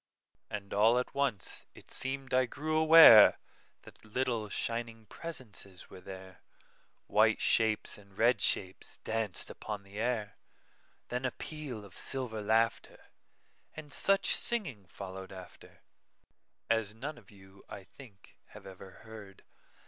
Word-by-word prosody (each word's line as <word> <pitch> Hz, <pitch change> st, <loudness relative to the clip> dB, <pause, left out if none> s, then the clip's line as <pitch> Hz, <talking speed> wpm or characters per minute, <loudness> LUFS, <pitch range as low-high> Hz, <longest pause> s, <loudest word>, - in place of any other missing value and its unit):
And 100 Hz, -2 st, -6 dB
all 110 Hz, +4 st, +4 dB
at 125 Hz, -, -2 dB
once 135 Hz, -9 st, -3 dB
it -, -, -14 dB
seem'd 135 Hz, 0 st, -3 dB
I 130 Hz, 0 st, +3 dB
grew 155 Hz, +5 st, -4 dB
awareThat 160 Hz, -9 st, +6 dB
little, 115 Hz, -1 st, -2 dB
shining 115 Hz, 0 st, -4 dB
presences 105 Hz, -, -8 dB
were 90 Hz, -, -12 dB
there,—White 95 Hz, -1 st, -3 dB
shapes 110 Hz, -2 st, +1 dB
and 100 Hz, -1 st, -20 dB
red 115 Hz, -2 st, +3 dB
shapes 95 Hz, -1 st, -1 dB
danced 110 Hz, -4 st, -3 dB
upon 105 Hz, -2 st, -7 dB
the 100 Hz, +1 st, -10 dB
air; 110 Hz, -3 st, -2 dB, 0.7 s
Then 125 Hz, +1 st, -3 dB
a 130 Hz, -, +1 dB
peal 135 Hz, -8 st, -7 dB
of 95 Hz, -, -16 dB
silver 125 Hz, -5 st, -3 dB
laughter, 110 Hz, +2 st, -1 dB, 0.6 s
And 150 Hz, -3 st, -10 dB
such 195 Hz, +6 st, +3 dB
singing 145 Hz, -, 0 dB
followed 95 Hz, +1 st, -9 dB
afterAs 105 Hz, +3 st, -8 dB
none 135 Hz, +3 st, -7 dB
of 105 Hz, -, -22 dB
you, 95 Hz, -1 st, -18 dB
I 100 Hz, -, -9 dB
think, 105 Hz, -1 st, -17 dB, 0.2 s
have -, -, -12 dB
ever 95 Hz, 0 st, -11 dB, 0.2 s
heard. 105 Hz, -3 st, -12 dB
110 Hz, 125 wpm, -31 LUFS, 100-130 Hz, 0.7 s, awareThat